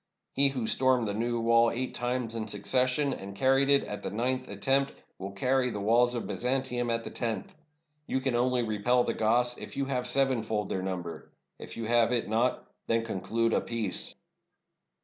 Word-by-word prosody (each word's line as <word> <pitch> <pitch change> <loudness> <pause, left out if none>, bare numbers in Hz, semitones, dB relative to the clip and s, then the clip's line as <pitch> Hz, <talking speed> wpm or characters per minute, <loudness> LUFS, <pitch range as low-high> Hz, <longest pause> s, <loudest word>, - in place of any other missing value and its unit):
He 140 +1 +5
who 130 -4 -3
stormed 125 0 +3
the 100 - -2
'New 120 +2 -1
Wall' 115 0 +4
eight 125 +2 -3
times 120 -1 -2
in 115 -1 -3
succession, 130 +6 +1
and 100 -3 -8
carried 135 +4 +3
it 140 0 +5
at 105 - -6
the - - -4
ninth 130 +4 -1
attempt, 135 +7 +1 0.3
will 95 +1 -5
carry 125 +4 +1
the 105 -3 -4
walls 120 +4 +3
of 120 - -3
Byzantium 125 -1 -1
at 115 0 0
the - - -7
tenth. 115 -2 -3 0.5
You 130 - 0
can 130 -1 -1
only 125 0 +2
repel 115 +3 +2
the - - -1
Goths 120 +2 +1
if - - -8
you 140 - 0
have 125 -2 -2
sevenfold 120 -6 0
their 95 - -2
number. 90 -3 -5 0.3
If - - -9
you 115 - -4
have 115 +1 +3
it 120 -2 0
not, 115 +4 0 0.2
then 115 0 +1
conclude 115 +2 -1
a - - +2
peace." 115 -5 -1
120 Hz, 190 wpm, -29 LUFS, 110-130 Hz, 0.5 s, He